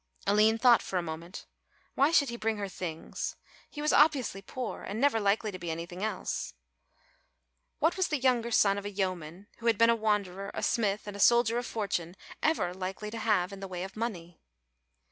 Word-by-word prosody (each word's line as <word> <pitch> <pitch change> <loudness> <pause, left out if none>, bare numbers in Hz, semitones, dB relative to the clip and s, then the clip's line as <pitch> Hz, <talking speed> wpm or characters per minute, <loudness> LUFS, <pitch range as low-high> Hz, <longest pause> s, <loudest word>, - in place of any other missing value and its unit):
Aline 215 +2 +4
thought 240 0 +6
for 190 - -3
a 175 - 0
moment; 170 +3 -7 0.5
why 280 +2 +4
should 285 -5 +4
he 235 - -4
bring 225 -2 -1
her 200 -1 -3
things, 175 -4 -5 0.3
he 295 - -6
was 300 - +2
obviously 275 -9 +3
poor 245 +4 -5
and 205 +3 -5
never 275 -4 +3
likely 210 +1 +1
to 185 - -8
be 170 -1 -5
anything 170 +4 -5
else? 220 - -3 1.2
What 330 +4 +1
was 375 - +2
the 305 - 0
younger 250 -3 +2
son 200 -3 +3
of 200 - -10
a - - -2
yeoman 185 -2 -3
who 235 - -4
had 225 -2 +4
been 230 0 +6
a - - +3
wanderer, 200 -3 -1
a - - -3
smith 210 -3 +1
and 205 -1 -7
a - - -8
soldier 235 +2 +4
of 245 - -5
fortune 180 -5 -3 0.3
ever 305 - +1
likely 190 +3 -5
to 230 - -5
have 200 -4 +1
in 195 - -8
the 195 - -6
way 180 -1 -5
of 190 0 -8
money? 180 -7 -5
205 Hz, 200 wpm, -30 LUFS, 185-235 Hz, 1.2 s, thought